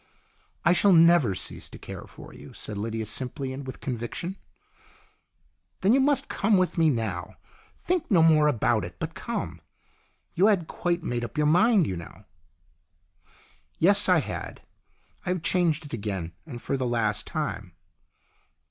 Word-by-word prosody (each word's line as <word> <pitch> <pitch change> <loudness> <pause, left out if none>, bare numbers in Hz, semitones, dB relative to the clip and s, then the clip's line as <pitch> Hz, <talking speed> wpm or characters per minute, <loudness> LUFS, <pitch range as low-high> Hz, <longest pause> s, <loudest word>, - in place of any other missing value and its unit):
" - - -36
I 175 - +6
shall 195 +2 +5
never 165 - +5
cease - - -5
to - - -11
care - - -9
for - - -13
you," - - -12
said 105 - -6
Lydia 110 +2 -3
simply 130 +4 -3
and 135 0 -7
with 130 - -8
conviction. 130 +9 -4 1.5
"Then 200 +4 +4
you 270 - +5
must 280 0 +2
come 205 0 +2
with 185 -1 +1
me 165 -2 +4
now. 110 - -3 0.4
Think 350 -4 -2
no 175 -7 +5
more 155 -2 +5
about 115 -5 +1
it, 85 0 -8
but - - -5
come. - - -5 0.7
You 190 +4 +4
had 195 -6 +2
quite 175 +1 -2
made 120 -1 -2
up 120 +3 -7
your 150 - +2
mind, 190 +5 +4
you 95 - -3
know." 85 +4 -11 0.8
" - - -43 0.7
Yes, 200 +3 +5
I 180 -4 +5
had. - - -7 0.6
I - - 0
have 180 -3 -1
changed 170 -4 +1
it 145 - -10
again, 100 -6 -4
and 125 -6 -7
for 135 - -2
the 130 -1 -1
last 110 -3 -1
time." 110 - -4
150 Hz, 165 wpm, -26 LUFS, 115-180 Hz, 1.5 s, I